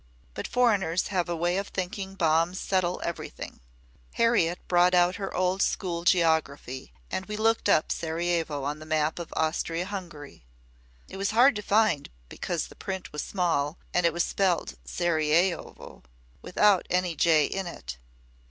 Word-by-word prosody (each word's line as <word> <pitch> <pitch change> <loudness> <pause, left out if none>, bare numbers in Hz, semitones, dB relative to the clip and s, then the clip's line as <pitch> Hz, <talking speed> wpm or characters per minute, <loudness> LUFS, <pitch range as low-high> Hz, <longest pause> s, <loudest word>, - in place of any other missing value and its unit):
But - - -5
foreigners 205 -8 +2
have 180 -3 -1
a 170 - -1
way 175 +2 0
of 200 +1 -2
thinking 190 +1 -4
bombs 165 +1 +2
settle 185 -2 0
everything. 170 - -6 0.5
Harriet 220 -8 +2
brought 180 0 +4
out 175 +1 +3
her 195 -1 -4
old 185 +1 0
school 170 -3 -1
geography 160 -7 +1 0.2
and 190 - -3
we 210 0 -4
looked 225 +1 +2
up 155 - +3
Sarajevo 165 -3 -1
on 145 +2 -3
the 155 - -11
map 155 +1 0
of 170 - -7
Austria 165 +2 0
Hungary. 175 - -8 0.6
It - - -9
was 200 +1 0
hard 255 +1 +6
to - - -3
find 210 -8 +2 0.2
because - - -3
the - - -14
print 190 -1 -6
was 150 - -2
small 165 -6 -1 0.2
and 180 - +2
it - - +1
was 170 +2 0
spelt 185 -4 0
Saraievo 170 +1 0 0.4
without 200 0 +3
any 180 -2 0
j 155 -1 +4
in 195 -1 -3
it. - - -7
175 Hz, 155 wpm, -27 LUFS, 160-190 Hz, 0.6 s, hard